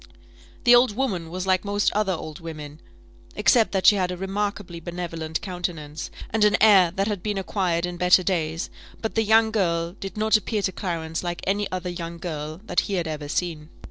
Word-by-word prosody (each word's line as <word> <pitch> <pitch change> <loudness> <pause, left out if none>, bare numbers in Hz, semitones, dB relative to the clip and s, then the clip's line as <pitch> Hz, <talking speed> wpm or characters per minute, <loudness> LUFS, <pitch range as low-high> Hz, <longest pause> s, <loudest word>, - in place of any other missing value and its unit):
The 245 - +7
old 240 -3 +5
woman 195 -11 -1
was 185 +2 -4
like 185 -1 +2
most 205 0 +1
other 205 -2 +1
old 155 -3 -6
women, 155 -2 -8 0.6
except 230 -3 +4
that 190 -1 0
she 205 - +7
had 185 -2 0
a 180 - -4
remarkably 195 -2 -3
benevolent 165 -2 -4
countenance, 175 -5 -5 0.2
and 220 -1 +2
an 210 -1 +5
air 195 -5 +7
that 195 - +1
had 205 -4 -2
been 210 0 -2
acquired 180 -2 0
in 175 0 -5
better 180 +1 +5
days; 165 -3 -1 0.3
but 220 - -3
the 225 - +2
young 220 +1 +4
girl 170 -5 0
did 195 +1 -8
not 220 +1 +3
appear 210 0 -2
to 190 - +1
Clarence 165 -4 -3
like 175 -1 -3
any 200 +1 0
other 180 -1 -3
young 170 -1 -6
girl 155 -1 -5
that 180 - +1
he 200 - 0
had 175 -3 -1
ever 150 -2 -4
seen. 160 -2 -2
180 Hz, 200 wpm, -24 LUFS, 165-205 Hz, 0.6 s, The